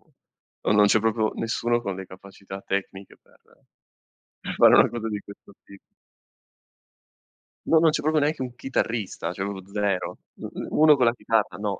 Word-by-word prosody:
o - - -33 0.5
o - - 0
non 105 0 +5
c'è 110 +2 +3
proprio 110 0 0
nessuno 120 +1 -1
con 100 -5 -4
le 95 -1 -8
capacità 95 +1 -11
tecniche 95 0 -5
per - - -28 1.2
fare - - +7
una - - +6
cosa 115 -1 -5
di 105 -1 -3
questo 100 0 -15
ti 100 0 -15 1.9
No, 160 - +5
non 165 - +5
c'è 150 - -1
proprio 155 0 +1
neanche 150 -2 0
un 125 -1 -7
chitarrista, 115 -9 -3
cioè 95 - -4
proprio 100 -1 -5
0. 100 -3 -1 0.5
1 155 -1 +5
con 125 -3 +2
la 115 - +3
chitarra, 115 -3 -1
no. 100 -2 -3
105 Hz, 165 wpm, -24 LUFS, 100-120 Hz, 1.9 s, fare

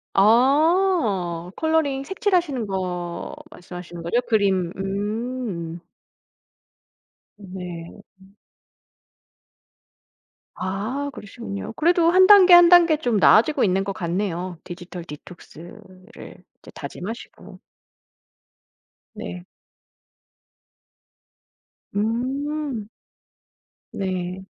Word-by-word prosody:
아. 235 - +2
컬러링 315 -4 0
색칠하시는 345 - -1
거 180 -3 -4 0.2
말씀하시는 175 -1 -10
거죠? 205 +9 +1
그림. 195 -6 +1
음. 200 -3 -4 1.6
네. 180 -4 -8 0.3
음. 190 +1 -20 2.2
아 220 +10 -3
그러시군요. 100 - -8
그래도 340 +1 +3
1 370 +1 +6
단계 385 -3 +8
1 350 -1 +9
단계 345 -3 +6
좀 245 -7 0
나아지고 255 +8 +4
있는 195 -1 +2
것 195 0 -4
같네요 180 -1 -3
디지털 175 0 -9
디톡스를 185 +5 -13 0.2
이제 - - -15
다짐하시고. 195 -1 -9 1.6
네. 85 +1 -7 2.5
음. 255 +3 -2 1.0
네. 185 -1 -4
205 Hz, 155 characters per minute, -23 LUFS, 180-280 Hz, 2.5 s, 1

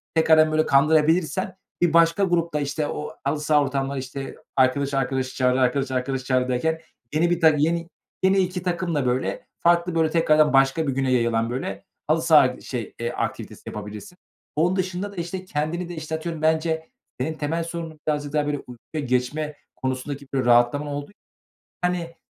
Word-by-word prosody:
tekrardan, 160 -1 +5
böyle, 155 0 +2
kandırabilirsen, 160 +5 +2 0.2
bir 175 -2 +3
başka 165 +3 +4
grup 170 -3 +1
da, 150 - +1
işte, 145 +1 -2
o 150 - -5
halı 155 - 0
saha 150 0 +3
ortamları, 135 0 -1
işte, 135 +1 -6 0.2
arkadaş 135 +2 +2
arkadaşı 130 -1 -1
çağırır, 125 0 +2
arkadaş 130 +1 +1
arkadaşı 130 0 -2
çağırır 130 -1 +1
derken, 160 +6 0 0.3
yeni 165 +3 +2
bir 175 0 0
ta 160 - +8
yeni 165 +3 +1 0.4
yeni 190 +1 +4
2 180 -1 0
takımla, 170 -5 -1
böyle, 125 +1 -1
farklı, 170 0 +2
böyle, 160 -1 +3
tekrardan 155 -2 +4
başka 135 +3 +3
bir 135 - 0
güne 135 -1 +1
yayılan, 115 -2 +2
böyle, 110 -6 -4 0.2
halı - - +2
saha, - - +5
şey - - -5
eee, - - -2
aktivitesi - - -4
yapabilirsin. 105 - -8 0.4
Onun 170 +5 +2
dışında 185 +1 -2
da, - - -13
işte, 180 +2 -5
kendini 165 +2 -2
de, 175 - -6
işte, 160 0 -4
atıyorum, 160 0 -5
bence 160 0 +1 0.3
senin 155 +5 -1
temel 160 +2 -2
sorunun 165 -2 -6
birazcık 145 -1 -1
daha, 150 -1 +1
böyle, 145 0 -1
uykuya 130 +4 -7
geçme 135 +5 -1 0.2
konusundaki 130 +2 -4
bir 130 -2 0
rahatlama 120 +5 +3
olduğu 145 +6 -5
için, - - -29 0.7
hani, 175 -2 -1
150 Hz, 175 wpm, -24 LUFS, 135-170 Hz, 0.7 s, ta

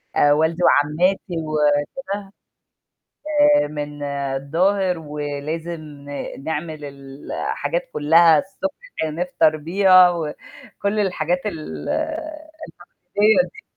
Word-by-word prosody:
آآ، 145 0 +5
والدي 160 +3 +1
وعمّاتي 175 +6 +2
وكده 155 - -1 1.2
آآ، 145 - +2
من 145 -1 -6
الضاهر 150 +7 0
ولازم 150 +2 -5 0.6
نعمل 155 -1 -4
ال 140 0 -10
الحاجات - - -2
كلّها 160 +1 +5
الصبح 195 - -4 0.2
كده 160 - -1
نفطر 165 -1 +1
بيها 185 +3 +5
وكل 175 +5 -5
الحاجات 180 -3 0
الـتقليدية 310 - -5 0.8
ديه. 435 +7 -11
160 Hz, 85 wpm, -21 LUFS, 145-190 Hz, 1.2 s, آآ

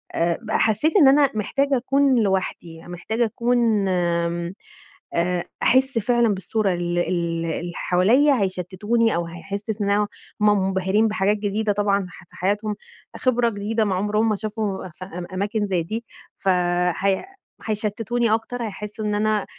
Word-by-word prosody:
آآ 170 0 +1
ب 220 -2 -7
حسيت 220 - +2
إن 305 -8 +7
أنا 280 +1 +5
محتاجة 275 +6 +1
أكون 270 +1 +2
لوحدي، 185 -4 -2
محتاجة 220 +7 -1
أكون، 230 -2 +1
آمم، 170 -1 0 0.6
آآ 175 +1 0 0.2
أحس 265 0 +3
فعلًا 235 -1 +2
بالصورة 195 +1 -1
ال 175 0 -2
ال 175 - +2 0.4
اللي 170 +1 -3
حواليَّ 225 +12 +3
هيشتتوني 205 +1 0
أو 170 0 -1
هيحسس 200 +5 -5
إن 200 - 0
هو 205 +1 +2 0.3
منبهرين 195 0 +2
بحاجات 210 0 +1
جديدة 205 +1 -1
طبعًا 200 -2 +1
ح 185 - -14
في - - -19
حياتهم، 205 +3 -1 0.4
خبرة 245 -2 +2
جديدة 215 +1 -1
ما 195 -2 0
عمرهم 210 +4 +1
ما 215 - +1
شافوا 210 -2 -3
ف 170 +2 -11
أما 180 -1 -7
أماكن 205 +2 -1
زي 180 -4 0
دي، 225 +7 -5 0.3
فهي 180 - +1 0.4
هيشتتوني 220 +2 0
أكتر، 235 +2 -2
هيحسوا 210 0 -6
إن 210 0 0
أنا 215 -1 +1
205 Hz, 145 wpm, -23 LUFS, 185-225 Hz, 0.6 s, إن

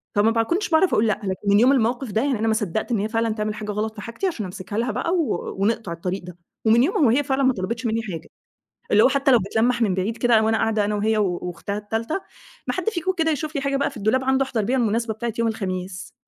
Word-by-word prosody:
فما 210 +2 +4
باكنش 340 - 0
باعرف 340 +3 +3
أقول 220 +2 +3
لأ. 215 - 0
لكن 190 +1 -4
من 200 +1 +5
يوم 255 +4 +6
الموقف 245 -1 +1
ده، 220 +2 +1
يعني 270 -6 0
أنا 225 - 0
ما 220 - +3
صدقت 215 +2 -2
إن 220 - +1
هي 215 +2 -1
فعلًا 225 0 0
تعمل 210 -1 -2
حاجة 210 0 -5
غلط 215 +2 -3
في 205 - -8
حاجتي 230 - -3
عشان 225 - -3
أمسكها 185 +2 -6
لها 240 +2 0
بقى 335 - -2 0.5
ونقطع 215 -1 0
الطريق 180 +2 -4
ده. 175 -1 -10 0.3
ومن 230 +2 +5
يومها 360 +4 +1
وهي 265 +2 +4
فعلًا 270 0 0
ما 260 -1 +4
طلبِتش 225 +5 -4
منّي 225 0 0
حاجة، 175 -6 -7 0.6
اللي 210 +2 +6
هو - - +6
حتى 275 0 +2
لو 245 - +6
بتلمّح 225 +5 0
من 200 -5 +2
بعيد 205 +5 -2
كده 235 -3 +4
وأنا 220 0 +2
قاعدة 220 -2 +1
أنا 210 0 -1
وهي 215 +1 +1
وأختها 180 +1 -2
التالتة، 225 - -3 0.5
"ما - - 0
حد - - -1
فيكم 375 -3 -1
كده 320 -1 +2
يشوف 310 +1 -3
لي 280 - 0
حاجة 275 0 0
بقى 280 - 0
في - - -11
الدولاب 220 +5 +1
عنده 265 +1 +2
أحضر 240 -4 -1
بيها 255 +5 0
المناسبة 230 -1 0
بتاعة 235 +1 -4
يوم 230 - +2
الخميس." 185 -4 -4
225 Hz, 250 wpm, -23 LUFS, 205-260 Hz, 0.6 s, يوم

